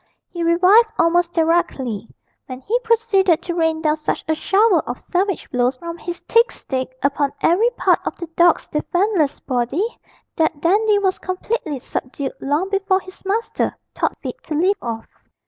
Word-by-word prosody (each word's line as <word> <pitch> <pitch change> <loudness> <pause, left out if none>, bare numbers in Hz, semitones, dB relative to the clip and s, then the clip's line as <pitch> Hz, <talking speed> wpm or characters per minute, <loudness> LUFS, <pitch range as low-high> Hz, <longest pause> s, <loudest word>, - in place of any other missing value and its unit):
He 345 - -5
revived 365 +7 +5
almost 340 +1 +3
directly, 320 - 0 0.4
when 255 -1 -7
he 455 - 0
proceeded 435 -7 +2
to 345 - -3
rain 320 -1 0
down 305 0 +2
such 305 - -3
a 320 - +2
shower 390 +3 +3
of 245 - -4
savage 380 0 -1
blows 250 +1 +1
from 335 +5 -7
his 345 +2 -6
thick 465 +1 +3
stick 260 -1 -5
upon 280 0 +1
every 400 +8 +4
part - - +3
of - - -3
the 345 - -6
dog's 345 -1 +4
defenceless 350 0 0
body, 270 - -2 0.4
that 315 -2 +1
Dandy 410 +6 +3
was 385 -2 0
completely 370 - -3
subdued 265 +2 -5
long 295 +7 -1
before 390 -1 +1
his 370 0 -14
master 430 +4 -1 0.2
thought - - -1
fit - - -6
to 310 - -3
leave 370 +6 +2
off. 225 -2 -4
340 Hz, 165 wpm, -20 LUFS, 295-390 Hz, 0.4 s, revived